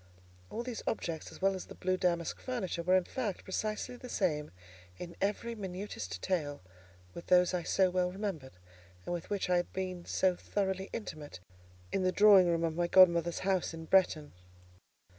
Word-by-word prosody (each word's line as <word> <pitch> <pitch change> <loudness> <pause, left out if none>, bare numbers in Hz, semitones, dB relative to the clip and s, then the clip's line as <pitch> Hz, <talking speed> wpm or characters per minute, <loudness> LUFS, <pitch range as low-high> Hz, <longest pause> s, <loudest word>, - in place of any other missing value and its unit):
All 235 - -4
these 245 -2 -5
objects, 165 -7 -3
as - - -12
well 195 0 +4
as 185 - -6
the - - -11
blue 185 0 0
damask 170 -3 -1
furniture, 205 -9 -3
were, 180 +2 +3
in 185 - +4
fact, 215 -2 -4
precisely 215 +5 -3
the 250 - -10
same, 150 -9 0 0.5
in 170 -1 -8
every 210 +4 -1
minutest 190 - -6
detail, 145 - -2 0.5
with 170 - -9
those 180 0 +4
I 180 - 0
so 185 +2 +2
well 180 0 +1
remembered, 185 -9 -5 0.5
and - - -3
with 170 -2 -5
which 205 -2 -1
I 180 -1 +3
had 175 - -2
been 185 -2 -4
so 185 -1 +2
thoroughly 190 0 -2
intimate, 150 - -7 0.5
in 195 - 0
the 185 0 +2
drawing 200 -2 +7
room 170 -1 +1
of 165 -1 -1
my 175 0 +1
godmother's 170 -2 +5
house 185 -3 0
at 160 -1 -10
Bretton. 170 -6 +3
185 Hz, 180 wpm, -32 LUFS, 170-195 Hz, 0.5 s, drawing